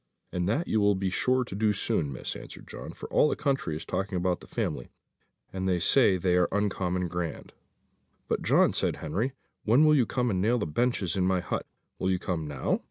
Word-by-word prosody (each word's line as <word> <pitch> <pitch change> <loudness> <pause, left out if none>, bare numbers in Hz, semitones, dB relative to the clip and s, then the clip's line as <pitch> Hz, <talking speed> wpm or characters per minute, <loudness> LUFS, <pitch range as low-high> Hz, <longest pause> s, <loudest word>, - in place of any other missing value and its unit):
"And 90 +1 -1
that 145 +11 0
you 110 - +2
will 100 0 +4
be 95 0 -1
sure 130 +6 +2
to 120 - -9
do 105 +1 +2
soon, 75 -6 0
Miss," 65 - -5
answered - - -10
John; - - -8
"for - - -9
all 150 - +5
the - - 0
country 135 - -1
is 80 +1 -6
talking 95 +3 -2
about 90 0 0
the - - -14
family, - - -3 0.6
and 95 0 -1
they 90 - +2
say 95 +2 +4
they 90 0 +1
are 90 - +4
uncommon 90 -3 0
grand." 85 -1 -5 0.7
"But, - - -1
John," - - +4
said - - 0
Henry, 125 +7 -2 0.3
"when 125 +8 +5
will 155 - +6
you 130 -7 +3
come 125 -2 0
and 95 -2 0
nail 115 +5 +3
the 110 - -1
benches 95 +1 0
in 95 -1 +1
my 95 -1 +2
hut? - - -3 0.3
Will 95 - 0
you 95 - +2
come 85 -4 -3
now? 70 -3 -1
95 Hz, 220 wpm, -28 LUFS, 90-115 Hz, 0.7 s, will